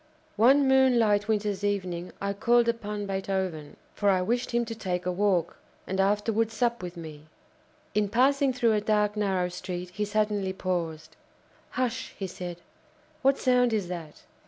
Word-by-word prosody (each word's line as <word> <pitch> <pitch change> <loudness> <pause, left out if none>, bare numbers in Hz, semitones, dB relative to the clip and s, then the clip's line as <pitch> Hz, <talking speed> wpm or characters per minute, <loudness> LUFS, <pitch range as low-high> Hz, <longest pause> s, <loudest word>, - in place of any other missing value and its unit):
One 270 +5 +5
moonlight 235 -6 +4
winter's 205 -2 -1
evening 185 -4 -2
I 200 0 -2
called 235 +3 +3
upon 210 -3 -2
Beethoven; 190 -6 -3 0.2
for 205 - +1
I 185 -2 +3
wished 240 +5 -1
him 235 0 0
to 225 - -5
take 180 -5 -3
a 180 - 0
walk, 180 -3 0 0.3
and 190 +1 -3
afterwards 210 +3 +1
sup 235 0 0
with 180 -1 -7
me. 155 -2 -9 0.7
In 210 -1 +1
passing 270 +5 +3
through 240 -3 +2
a 210 - +1
dark, 210 0 +1
narrow 190 -4 0
street, 180 0 -6
he 210 +3 -3
suddenly 210 -2 0
paused. 170 -4 -3 0.6
"Hush!" 250 -3 -2
he 195 - -3
said, 175 -1 -7 0.6
"what 270 +1 +3
sound 250 -2 +3
is 200 -5 -1
that? 165 -4 -7
205 Hz, 160 wpm, -27 LUFS, 180-230 Hz, 0.7 s, One